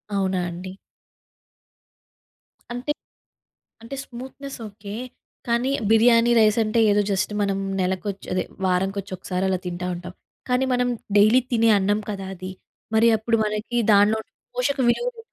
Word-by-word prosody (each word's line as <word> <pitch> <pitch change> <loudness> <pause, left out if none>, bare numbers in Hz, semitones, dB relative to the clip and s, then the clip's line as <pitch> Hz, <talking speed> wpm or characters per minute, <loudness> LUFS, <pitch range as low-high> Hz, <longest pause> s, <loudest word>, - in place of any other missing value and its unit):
అవునా 190 -2 0
అండి? 180 +2 -7 2.0
అంటె 245 +5 -3 0.9
అంటే 230 +4 -7
స్మూత్‍నెస్ 265 +3 -8
ఓకే. 205 0 -9 0.5
కానీ, 235 +2 +1 0.2
బిర్యానీ 230 +1 +5
రైస్ 215 0 +4
అంటే, 215 +2 0
ఏదో 205 - +3
జస్ట్ 195 +2 0
మనం 200 -1 0 0.2
నెలకొచ్చ్ 190 +2 -2
అదే 185 - +1 0.2
వారంకొచ్చి 190 +2 -1
ఒకసారి 185 0 -2
అలా 185 -1 0
తింటా 180 0 -4
ఉంటాం. 180 +1 -8 0.4
కానీ, 250 +1 +2
మనం 245 0 +1 0.3
డైలీ 215 +5 +6
తినే 230 -1 +4
అన్నం 205 +2 +1
కదా 195 -2 -4
అది. 185 +1 -7 0.4
మరి 225 +1 +5
అప్పుడు 230 +1 0
మనకి 215 +3 -2 0.2
దాన్లో 205 +2 +5
ఉండే - - -26 0.2
పోషక 385 - 0
విలువలు 480 - -1
210 Hz, 135 wpm, -23 LUFS, 190-240 Hz, 2.0 s, డైలీ